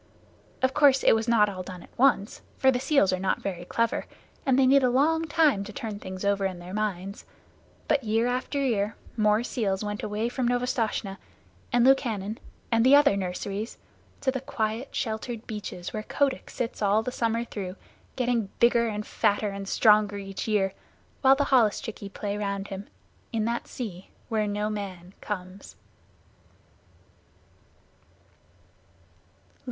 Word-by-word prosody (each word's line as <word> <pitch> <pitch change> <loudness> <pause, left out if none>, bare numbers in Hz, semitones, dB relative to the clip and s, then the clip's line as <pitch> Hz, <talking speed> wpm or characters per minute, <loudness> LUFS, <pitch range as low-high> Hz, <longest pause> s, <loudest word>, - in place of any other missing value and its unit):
Of 260 0 +3
course 280 -3 +5
it - - +6
was 225 +1 0
not 225 -3 +5
all 190 -2 -5
done 180 -1 -8
at - - -19
once, 245 -6 +2 0.2
for 265 - +5
the 250 - 0
seals 260 - +3
are 185 - -1
not 190 0 -1
very 175 -3 -4
clever, 230 +4 -1 0.4
and 260 -1 +4
they 270 - +5
need 275 +2 +6
a 255 - +3
long 315 +6 +2
time 300 -9 +3
to 210 - -8
turn 215 -3 -5
things 185 0 -6
over 200 0 +2
in 190 -2 -1
their 175 +1 -9
minds, 200 -2 -3 0.6
but 290 -3 +2
year 225 +1 +1
after 250 +3 -1
year 220 -6 0 0.2
more 215 0 +3
seals 210 -6 -1
went 210 0 -3
away 210 +2 -2
from 245 0 -1
Novastoshnah, 240 -5 -1 0.5
and 245 -1 +4
Lukannon, 225 -6 +2 0.3
and 230 -1 +4
the 265 +3 +7
other 285 -7 +5
nurseries, 195 +3 -4 0.4
to 265 - +2
the 265 -1 -4
quiet, 225 0 -3
sheltered 225 0 -3
beaches 205 -5 -6
where 215 - -2
Kotick 270 +4 -1
sits 240 -2 -4
all 210 +2 +3
the 250 - -3
summer 230 -1 0
through, 190 -5 -6 0.4
getting 240 -5 0
bigger 235 0 +4
and 210 -1 -3
fatter 205 +1 +1
and 195 0 -6
stronger 210 -2 +4
each 195 +1 -5
year, 195 -3 +1 0.5
while 270 0 +7
the 285 +1 +1
holluschickie 220 -3 +1
play 205 0 -3
around 200 -1 -3
him, 195 +1 -6 0.4
in 220 -2 0
that 235 +1 -2
sea 190 -7 -7 0.2
where 215 -2 +1
no 205 +1 -1
man 190 -4 -6
comes. 185 -1 -6
215 Hz, 160 wpm, -27 LUFS, 200-245 Hz, 0.6 s, the